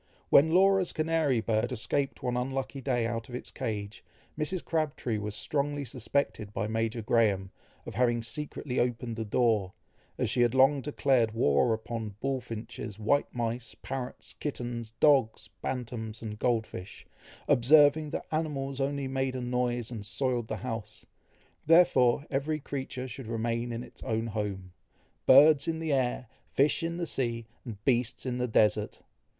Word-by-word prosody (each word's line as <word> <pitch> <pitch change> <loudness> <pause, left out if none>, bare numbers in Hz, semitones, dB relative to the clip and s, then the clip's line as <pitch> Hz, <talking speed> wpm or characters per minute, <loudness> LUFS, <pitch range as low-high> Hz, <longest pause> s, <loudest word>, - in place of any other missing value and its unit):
When 150 +3 +7
Laura's 190 0 +4
canary 155 -6 +1
bird 110 +2 0
escaped 135 +4 -2
one 125 -1 0
unlucky 135 +2 -3
day 125 -3 0
out 115 0 -3
of 125 - -6
its 125 - -6
cage, 105 -5 -4 0.3
Mrs. 160 +4 -3
Crabtree 150 -8 -1
was 105 0 -4
strongly 145 -1 -1
suspected 125 -3 -2
by - - -1
Major 115 +1 -1
Graham, 105 -5 +2 0.3
of - - -7
having 120 -1 +1
secretly 135 +2 -3
opened 120 -1 -1
the 110 - -3
door, 105 -3 +1 0.4
as - - 0
she 120 - +1
had 120 +1 +3
long 135 +2 +5
declared 130 -6 +1
war 75 +1 +3
upon 110 -2 -4
bulfinches, 115 -5 -4
white 115 +7 +1
mice, 120 0 -3
parrots, 130 -1 -5
kittens, 120 -5 -4
dogs, 135 -7 +3
bantams, 115 -3 -4
and 105 -1 -6
gold 115 -3 +1
fish, 90 -1 -9 0.4
observing 145 +4 +5
that - - -4
animals 140 -4 -2
only 140 0 -1
made 135 0 -1
a 130 - -3
noise 125 -1 -1
and 110 -4 -5
soiled 125 -1 0
the 110 - -3
house, 110 -3 -6 0.6
therefore 145 -6 +5
every 145 +3 -1
creature 135 -2 -5
should 130 -1 -8
remain 115 +1 -2
in 115 +1 -4
its - - -14
own 110 0 -1
home, 100 -4 -4 0.5
"birds 140 +2 +7
in 165 -1 0
the 160 -2 -1
air, 130 -1 0 0.2
fish 145 +5 +2
in 165 +1 -2
the 175 - -2
sea, 120 -6 -2 0.2
and 105 -5 -9
beasts 125 0 +1
in 125 -1 -2
the 125 - 0
desert." 110 -2 +2
125 Hz, 155 wpm, -29 LUFS, 115-140 Hz, 0.6 s, When